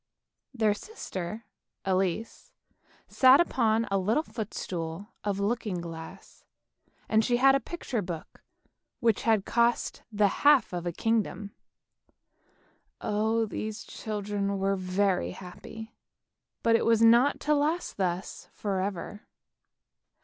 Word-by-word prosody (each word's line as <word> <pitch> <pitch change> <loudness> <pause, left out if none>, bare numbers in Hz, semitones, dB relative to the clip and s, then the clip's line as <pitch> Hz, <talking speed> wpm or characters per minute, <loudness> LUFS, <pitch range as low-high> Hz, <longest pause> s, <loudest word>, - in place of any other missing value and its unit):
Their 220 -5 +2
sister 215 - -6 0.4
Elise 190 +3 -1 0.6
sat 260 +1 +6
upon 230 -9 +2
a 195 - +2
little 220 +11 +1
footstool 190 - -5
of 200 -1 -1
looking 205 -3 -1
glass, 165 -1 -9 0.6
and 220 0 +3
she 240 +2 +2
had 270 +2 +6
a 275 - +3
picture 255 -4 -4
book 175 -4 -7 0.6
which 230 -4 +2
had 215 -3 +3
cost 235 0 +1
the 205 -1 +3
half 285 -9 +5
of 175 0 -3
a - - 0
kingdom. 215 +1 -1 1.5
Oh, 220 +2 +1
these 215 0 -5
children 205 -2 -3
were 195 +1 +1
very 185 0 0
happy; 220 +5 -10 0.7
but 230 0 +4
it - - +2
was 230 -1 +4
not 235 +5 +5
to 300 - +2
last 305 +4 0
thus 180 -1 -3
for 195 -3 -2
ever. 200 +1 -5
210 Hz, 120 wpm, -28 LUFS, 190-230 Hz, 1.5 s, sat